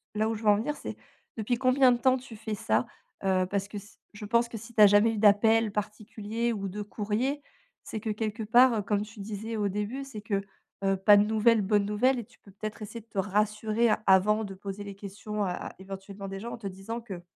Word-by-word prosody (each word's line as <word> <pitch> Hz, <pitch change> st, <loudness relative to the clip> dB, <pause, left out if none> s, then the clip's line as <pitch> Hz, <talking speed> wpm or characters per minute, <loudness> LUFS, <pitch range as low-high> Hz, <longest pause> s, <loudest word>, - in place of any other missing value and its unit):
là 215 Hz, +1 st, +1 dB
où 225 Hz, -, -1 dB
je 215 Hz, -, -8 dB
veux 210 Hz, -, +4 dB
en 205 Hz, -, +6 dB
venir 295 Hz, +7 st, -2 dB
c'est -, -, -7 dB, 0.4 s
depuis 225 Hz, +3 st, 0 dB
combien 255 Hz, 0 st, +4 dB
de -, -, 0 dB
temps 260 Hz, +1 st, +4 dB
tu 250 Hz, -3 st, -11 dB
fais 220 Hz, 0 st, -4 dB
ça? 110 Hz, -, +1 dB, 0.4 s
Heu, 185 Hz, -1 st, +2 dB
parce 200 Hz, 0 st, -2 dB
que 210 Hz, -, -6 dB
s 205 Hz, +2 st, -12 dB
je 205 Hz, 0 st, -9 dB
pense 235 Hz, +2 st, +2 dB
que 225 Hz, -, -6 dB
si 225 Hz, +3 st, -11 dB
tu 215 Hz, -, +3 dB
as 205 Hz, -, +11 dB
jamais 205 Hz, +3 st, +4 dB
eu 220 Hz, -, -4 dB
d'appels 220 Hz, +1 st, +4 dB
particuliers 215 Hz, +2 st, -3 dB
ou 200 Hz, -3 st, -3 dB
de 205 Hz, +3 st, -5 dB
courriers, 220 Hz, +8 st, -2 dB, 0.4 s
c'est 220 Hz, -, -5 dB
que 220 Hz, -, -4 dB
quelque 215 Hz, +1 st, -3 dB
part, 235 Hz, -1 st, +5 dB
comme 205 Hz, 0 st, 0 dB
tu 215 Hz, 0 st, -13 dB
disais 220 Hz, +2 st, -5 dB
au 205 Hz, -2 st, 0 dB
début, 210 Hz, +7 st, -3 dB
c'est 235 Hz, -6 st, -8 dB
que, 200 Hz, -2 st, -1 dB, 0.4 s
heu, 195 Hz, 0 st, +2 dB
pas 205 Hz, +2 st, +7 dB
de 205 Hz, -, +5 dB
nouvelles, 220 Hz, +1 st, +3 dB
bonne 205 Hz, 0 st, +2 dB
nouvelle 245 Hz, +6 st, +2 dB
et 230 Hz, -, -6 dB
tu -, -, -25 dB
peux 200 Hz, -, -19 dB
peut-être 215 Hz, +3 st, -7 dB
essayer 230 Hz, +2 st, -7 dB
de 220 Hz, -, -26 dB
te 205 Hz, -3 st, -5 dB
rassurer 210 Hz, +3 st, +1 dB, 0.2 s
avant 210 Hz, +3 st, +4 dB
de 195 Hz, -, -7 dB
poser 200 Hz, +1 st, -7 dB
les 200 Hz, -1 st, -8 dB
questions 205 Hz, +1 st, -5 dB
à 180 Hz, -, -1 dB
à -, -, -6 dB
éventuellement 195 Hz, +1 st, -8 dB
des 195 Hz, 0 st, -6 dB
gens 235 Hz, +4 st, -6 dB
en -, -, -6 dB
te 205 Hz, -3 st, -6 dB
disant 195 Hz, +5 st, -6 dB
que: 195 Hz, -7 st, -8 dB
210 Hz, 240 wpm, -28 LUFS, 200-225 Hz, 0.4 s, as